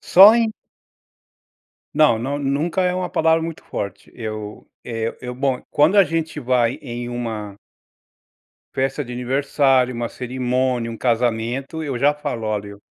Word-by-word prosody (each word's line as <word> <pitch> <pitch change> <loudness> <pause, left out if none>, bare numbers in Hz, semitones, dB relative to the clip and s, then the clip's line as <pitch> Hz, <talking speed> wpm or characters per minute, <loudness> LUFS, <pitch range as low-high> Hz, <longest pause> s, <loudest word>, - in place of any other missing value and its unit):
Só 200 +5 +8
em 230 -2 +1 1.4
Não 150 -8 +4
não, 140 +5 -2
nunca 145 +6 0
é 180 0 +1
uma 180 0 -2
palavra 160 0 +3
muito 165 -1 -6
forte. 100 0 -6
Eu, 110 -2 -6 0.2
eh, 115 -1 -3
eu 125 -1 -5
bom, 130 0 -1
quando 155 +7 +4
a 200 - +9
gente 160 -3 -2
vai 125 -2 +1
em 120 0 -5
uma 110 -4 -5 1.2
festa 135 +2 -1
de 125 - -9
aniversário, 130 +1 +2
uma 120 0 -2
cerimônia, 125 -1 -1
um 115 - -7
casamento, 120 +5 -1
eu 140 -5 -3
já 145 +4 +3
falo: 145 -6 -4
"Olha, 105 -1 -2
eu 100 0 -12
130 Hz, 150 wpm, -21 LUFS, 115-150 Hz, 1.4 s, a